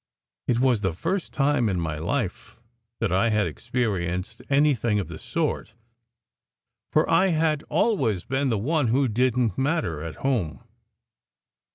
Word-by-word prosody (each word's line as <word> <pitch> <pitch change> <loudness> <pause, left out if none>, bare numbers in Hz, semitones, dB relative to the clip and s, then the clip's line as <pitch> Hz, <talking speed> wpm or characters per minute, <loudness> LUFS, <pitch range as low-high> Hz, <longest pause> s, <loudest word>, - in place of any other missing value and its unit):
It 120 - +2
was 125 -4 +3
the 95 -4 0
first 170 - -2
time 140 -5 +2
in 95 -3 -1
my 80 -2 -3
life 100 - -3 0.4
that - - 0
I 95 +6 +3
had 105 -2 +2
experienced 100 -7 -2
anything 135 -6 +3
of 90 -5 -4
the 80 - -8
sort, - - -2 1.2
for - - +3
I 190 - +4
had 155 -3 +1
always 140 - +1
been 135 +1 0
the 115 - +1
one 145 +5 +1
who 130 +4 +2
didn 125 0 +2
t 95 - -4
matter, 135 - 0
at 80 0 -6
home. 115 - -1
120 Hz, 150 wpm, -25 LUFS, 95-140 Hz, 1.2 s, I